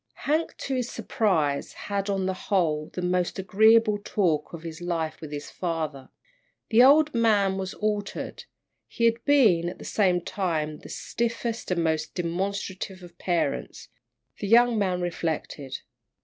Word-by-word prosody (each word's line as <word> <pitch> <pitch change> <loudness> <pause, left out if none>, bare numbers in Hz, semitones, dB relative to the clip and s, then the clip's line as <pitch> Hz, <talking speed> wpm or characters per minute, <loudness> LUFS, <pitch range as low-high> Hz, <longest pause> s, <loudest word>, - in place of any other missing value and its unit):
Hank, 310 +3 0
to 275 - -4
his 250 -2 -1
surprise, 155 -10 0
had, 200 0 -3
on 195 -1 0
the 190 - 0
whole, 160 -6 0
the 180 - -5
most 180 0 0
agreeable 215 +3 +4
talk 175 -9 0
of 170 -1 -8
his 165 0 -7
life 165 -3 -2
with 155 -2 -8
his 145 0 -6
father. 155 -6 -3 0.6
The 230 +1 +6
old 295 +4 +6
man 205 -5 +3
was 190 0 -4
altered. 210 -1 -3 0.4
He 235 - -1
had 230 0 +2
been, 210 -13 +4
at - - -9
the - - -11
same 185 -4 +2
time, 160 -5 -2
the - - -12
stiffest 230 0 -3
and 180 - 0
the 170 - +1
most 160 -1 -1
demonstrative 185 +1 -3
of 175 0 -14
parents, 175 -2 -2 0.5
the 205 - -3
young 240 +2 +5
man 185 -3 0
reflected. 160 -5 -3
190 Hz, 155 wpm, -26 LUFS, 165-220 Hz, 0.6 s, The